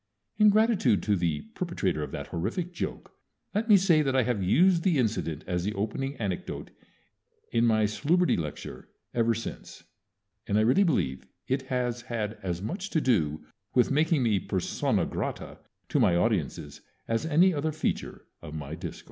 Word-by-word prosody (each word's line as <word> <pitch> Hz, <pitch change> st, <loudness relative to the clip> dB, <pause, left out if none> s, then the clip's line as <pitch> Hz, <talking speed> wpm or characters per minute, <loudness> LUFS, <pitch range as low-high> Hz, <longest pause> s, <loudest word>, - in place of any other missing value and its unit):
In 210 Hz, -1 st, +6 dB
gratitude 210 Hz, -, +3 dB
to 105 Hz, -, +2 dB
the 85 Hz, -5 st, -1 dB
perpetrator 105 Hz, -, -2 dB
of 75 Hz, -, -4 dB
that -, -, -5 dB
horrific 170 Hz, -, -3 dB
joke -, -, -5 dB, 0.4 s
let 220 Hz, +3 st, -1 dB
me 205 Hz, -, +9 dB
say 175 Hz, -5 st, +4 dB
that 135 Hz, -3 st, 0 dB
I 130 Hz, -, +4 dB
have 120 Hz, -4 st, -1 dB
used 170 Hz, -, +4 dB
the 170 Hz, -3 st, +2 dB
incident 105 Hz, -, -1 dB
as 90 Hz, -1 st, -1 dB
the 105 Hz, +3 st, -2 dB
opening 135 Hz, +7 st, -2 dB
anecdote 100 Hz, -7 st, -4 dB, 0.8 s
in 115 Hz, 0 st, +3 dB
my 110 Hz, -1 st, +3 dB
Salubrity 160 Hz, -, +2 dB
lecture 75 Hz, -3 st, -6 dB, 0.2 s
ever 115 Hz, -1 st, +2 dB
since, 115 Hz, -, -7 dB, 0.6 s
and 100 Hz, -, +1 dB
I -, -, +4 dB
really 130 Hz, -, +4 dB
believe 65 Hz, -, 0 dB, 0.2 s
it 130 Hz, +1 st, 0 dB
has 125 Hz, -2 st, -1 dB
had 115 Hz, -3 st, -4 dB
as 90 Hz, -1 st, -3 dB
much 185 Hz, -, -4 dB
to 165 Hz, -, +1 dB
do 80 Hz, -, +1 dB, 0.3 s
with 125 Hz, +1 st, +4 dB
making 150 Hz, 0 st, +2 dB
me 110 Hz, -4 st, +2 dB
persona -, -, 0 dB
grata -, -, -5 dB, 0.3 s
to -, -, +1 dB
my 85 Hz, -, +4 dB
audiences 85 Hz, -, -1 dB, 0.3 s
as 115 Hz, +7 st, -1 dB
any 175 Hz, +4 st, +4 dB
other 155 Hz, +1 st, -1 dB
feature 155 Hz, -, -3 dB, 0.2 s
of 75 Hz, -, -8 dB
my 75 Hz, -1 st, -6 dB
discourse. 85 Hz, +1 st, -6 dB
115 Hz, 170 wpm, -28 LUFS, -, 0.8 s, me